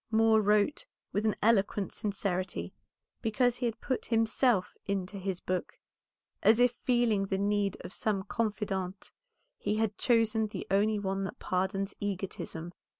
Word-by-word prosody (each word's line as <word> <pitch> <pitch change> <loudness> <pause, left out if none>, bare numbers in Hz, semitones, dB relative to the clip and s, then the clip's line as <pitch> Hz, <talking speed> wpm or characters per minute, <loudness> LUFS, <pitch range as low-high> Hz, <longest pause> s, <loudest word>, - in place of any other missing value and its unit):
Moor 220 0 +5
wrote 210 - +2 0.2
with 215 +2 0
an 215 - +1
eloquent 205 -2 +2
sincerity, 185 - -2 0.5
because 245 +2 +2
he 245 - 0
had 230 - -4
put 260 - -2
himself 225 -2 +2
into 195 0 -2
his 190 -1 -3
book, 185 -1 -3 0.6
as 220 +2 +5
if 245 -1 +5
feeling 235 -5 +1
the 195 - 0
need 200 -1 +1
of - - -7
some 205 -3 -1
confidante 200 -3 -2 0.5
he 210 - 0
had 215 -2 -1
chosen 225 -2 +3
the 210 - -6
only 210 +2 +3
one 195 -1 -1
that - - -6
pardons 195 +2 -1
egotism. 185 -4 -4
205 Hz, 145 wpm, -30 LUFS, 195-225 Hz, 0.6 s, Moor